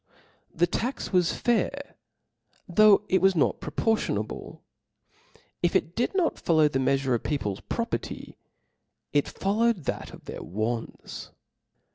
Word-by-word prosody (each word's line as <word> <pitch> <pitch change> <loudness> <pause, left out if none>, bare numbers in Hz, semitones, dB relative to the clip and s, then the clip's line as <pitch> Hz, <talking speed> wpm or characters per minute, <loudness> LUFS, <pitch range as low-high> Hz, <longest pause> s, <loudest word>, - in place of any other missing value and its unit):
The 170 - +2
tax 235 +6 -3
was 180 -2 +4
fair, 275 +4 -1 0.7
though 210 +3 +6
it 190 -3 +2
was 190 0 +4
not 155 - +2
proportionable: 220 +9 -2 1.0
if 175 - +1
it 170 - +1
did 245 +10 0
not 360 -4 +1
follow 160 -2 +4
the 135 -2 -1
meafure 135 0 +1
of 120 - +1
people's 105 -10 -2
property, 230 0 -4 0.8
it 145 -1 +2
fol 200 +2 -2
lowed 230 -7 +2
that - - -4
of - - -13
their - - -7
wants. 110 +5 -4
175 Hz, 130 wpm, -27 LUFS, 140-225 Hz, 1.0 s, though